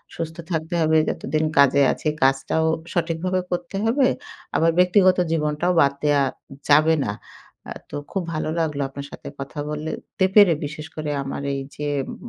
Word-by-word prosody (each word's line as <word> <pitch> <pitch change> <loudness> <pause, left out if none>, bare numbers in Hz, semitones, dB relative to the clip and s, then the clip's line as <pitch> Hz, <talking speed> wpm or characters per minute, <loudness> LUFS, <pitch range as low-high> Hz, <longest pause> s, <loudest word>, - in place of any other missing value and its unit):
সুস্থ 165 -1 -5 0.2
থাকতে 160 +1 -2
হবে 160 0 +3
যতদিন 155 +3 -1
কাজে 140 0 +5
আছি। - - -5 0.2
কাজটাও 135 +4 +2 0.3
সঠিকভাবে 175 +2 -1
করতে 175 +2 -3
হবে। 255 +4 +3 0.5
আবার 165 +1 +3
ব্যক্তিগত 185 0 +5
জীবনটাও 150 +2 0
বাদ 140 -1 +3
দেয়া 145 -1 +3 0.5
যাবে 155 +2 +5
না। 100 - -1 0.6
আ - - -7 0.2
তো - - -7 0.2
খুব 195 - -2
ভালো 155 0 -2
লাগলো 150 -3 -1
আপনার 140 +1 -8
সাথে - - -10
কথা 140 +2 -6
বললে 150 +1 -4 0.3
তে 190 - +5
পেরে। 205 -5 +8
বিশেষ 150 +1 -7
করে 155 -1 -3
আমার 135 +1 -5
এই 135 - -3
যে, 150 - -4 0.2
ম - - -6
155 Hz, 165 wpm, -23 LUFS, 145-175 Hz, 0.6 s, পেরে